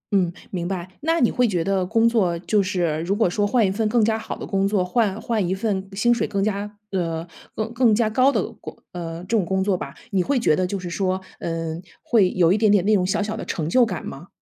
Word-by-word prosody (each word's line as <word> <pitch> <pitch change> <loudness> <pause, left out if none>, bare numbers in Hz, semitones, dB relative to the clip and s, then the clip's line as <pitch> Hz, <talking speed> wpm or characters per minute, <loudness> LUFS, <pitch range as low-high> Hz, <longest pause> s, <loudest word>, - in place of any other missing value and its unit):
嗯， 180 -3 +2 0.2
明 175 -2 -3
白， 180 -2 -4
那 325 +3 +1
你 240 - +3
会 250 -1 +2
觉 180 -6 0
得 195 0 +1
工 225 +3 +3
作 195 -8 +2
就 205 +4 +1
是 175 -5 -1
如 185 +4 0
果 220 -1 +3
说 205 +3 0
换 230 +1 +3
一 190 - +1
份 215 +1 0
更 230 -1 +3
加 220 0 +1
好 220 - -5
的 - - -6
工 195 -1 +1
作， 200 -3 +1
换 210 +1 0
换 220 -5 -1
一 185 - 0
份 195 -2 -2
薪 240 +5 +3
水 240 - -1
更 195 -1 -1
加， 205 0 -2 0.2
呃， 165 -3 -2 0.3
更 220 +2 -3
更 235 -3 +4
加 225 0 +2
高 255 +4 +4
的 - - 0 0.2
工 - - -9
呃， 165 -1 -6
这 230 +5 -1
种 210 - +3
工 190 +2 0
作 195 -1 +1
吧， - - -6 0.2
你 195 -2 +2
会 275 +8 0
觉 155 -10 +3
得 185 +2 0
就 200 - -3
是 180 -2 -6
说， 185 +1 0 0.2
嗯， 165 0 -3 0.2
会 210 -6 +3
有 175 -1 +3
一 210 - +1
点 215 -1 +4
点 200 -3 +3
那 215 - +4
种 195 -3 +3
小 195 - 0
小 215 +1 -3
的 225 - -5
成 155 -3 -3
就 245 +9 +4
感 - - -5
吗？ - - -8
195 Hz, 280 characters per minute, -23 LUFS, 180-220 Hz, 0.3 s, 更